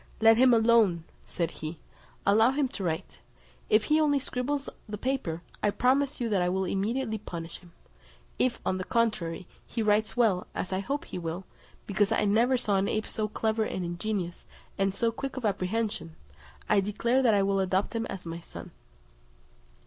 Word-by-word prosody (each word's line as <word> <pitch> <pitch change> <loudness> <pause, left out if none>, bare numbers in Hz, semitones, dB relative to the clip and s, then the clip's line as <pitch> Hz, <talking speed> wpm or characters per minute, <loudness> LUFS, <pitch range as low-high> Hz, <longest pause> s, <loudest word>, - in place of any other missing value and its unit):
"Let 225 0 +6
him 255 +1 +6
alone," 225 -7 +4 0.2
said 170 -2 -2
he, 155 +2 -6 0.5
"allow 220 +4 +5
him 275 +1 +1
to 205 - -6
write. 160 - -3 0.5
If 215 0 +5
he 310 +1 +3
only 290 -2 +3
scribbles 275 +2 -2 0.2
the 210 - -4
paper, 205 -10 -2 0.2
I 210 - +3
promise 270 +6 +1
you 240 - 0
that 200 -4 +2
I 180 - +2
will 190 +1 0
immediately 220 +5 -1
punish 170 -4 -7
him. 175 -2 -18 0.7
If, 255 - +1
on 185 - 0
the - - -2
contrary, 190 -7 0 0.2
he 230 - -3
writes 215 +2 +2
well, 210 -7 +2
as 185 - -3
I 185 - 0
hope 275 +9 -3
he - - -6
will, 170 +2 -4 0.4
because 200 0 +1
I - - +2
never 235 +6 +3
saw 205 -5 +1
an 195 +1 +1
ape 215 0 -1
so 215 -1 -2
clever 220 +1 0
and 185 -4 -3
ingenious, 175 0 -3 0.3
and 195 0 +1
so 230 +4 0
quick 270 +3 -5
of 255 - -3
apprehension, 195 -4 -1 0.5
I 210 - +4
declare 230 +6 +1
that 230 -5 +4
I 200 - +3
will 195 0 +1
adopt 190 +1 0
him 230 0 -1
as 190 -2 -7
my 165 0 -5
son." - - -10
210 Hz, 185 wpm, -28 LUFS, 185-235 Hz, 0.7 s, Let